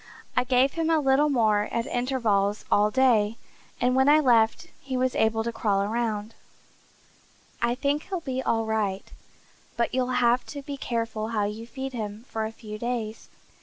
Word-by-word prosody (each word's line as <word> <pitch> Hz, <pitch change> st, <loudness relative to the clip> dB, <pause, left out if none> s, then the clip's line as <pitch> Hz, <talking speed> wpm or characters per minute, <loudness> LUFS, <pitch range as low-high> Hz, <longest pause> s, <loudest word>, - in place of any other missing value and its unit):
I 250 Hz, -, +2 dB
gave 255 Hz, +1 st, +3 dB
him 330 Hz, -1 st, -1 dB
a 325 Hz, -, +4 dB
little 280 Hz, +1 st, +3 dB
more 215 Hz, -6 st, +2 dB
at 230 Hz, 0 st, -1 dB
intervals 225 Hz, -5 st, 0 dB
all 210 Hz, +1 st, +4 dB
day, 230 Hz, -3 st, +3 dB, 0.4 s
and 250 Hz, +1 st, +2 dB
when 265 Hz, +2 st, +4 dB
I 300 Hz, +1 st, +7 dB
left 235 Hz, -1 st, +3 dB, 0.2 s
he 265 Hz, -1 st, -3 dB
was 255 Hz, 0 st, +1 dB
able 225 Hz, 0 st, +1 dB
to 235 Hz, -, -2 dB
crawl 200 Hz, -3 st, 0 dB
around. 220 Hz, 0 st, -2 dB, 1.3 s
I 235 Hz, +1 st, +1 dB
think 285 Hz, +3 st, -1 dB
he'll 375 Hz, -2 st, -2 dB
be 260 Hz, -5 st, -3 dB
all 225 Hz, -3 st, 0 dB
right, 210 Hz, -3 st, -2 dB, 0.7 s
but 235 Hz, +1 st, 0 dB
you'll 255 Hz, 0 st, 0 dB
have 240 Hz, 0 st, +3 dB
to 285 Hz, -1 st, -7 dB
be 285 Hz, +1 st, -5 dB
careful 230 Hz, -4 st, -3 dB
how 220 Hz, -2 st, -1 dB
you 215 Hz, +3 st, -5 dB
feed 265 Hz, +2 st, -6 dB
him 215 Hz, -1 st, -5 dB
for 220 Hz, -1 st, -2 dB
a -, -, -7 dB
few 215 Hz, -1 st, -9 dB
days. 230 Hz, -2 st, -4 dB
235 Hz, 175 wpm, -26 LUFS, 220-260 Hz, 1.3 s, I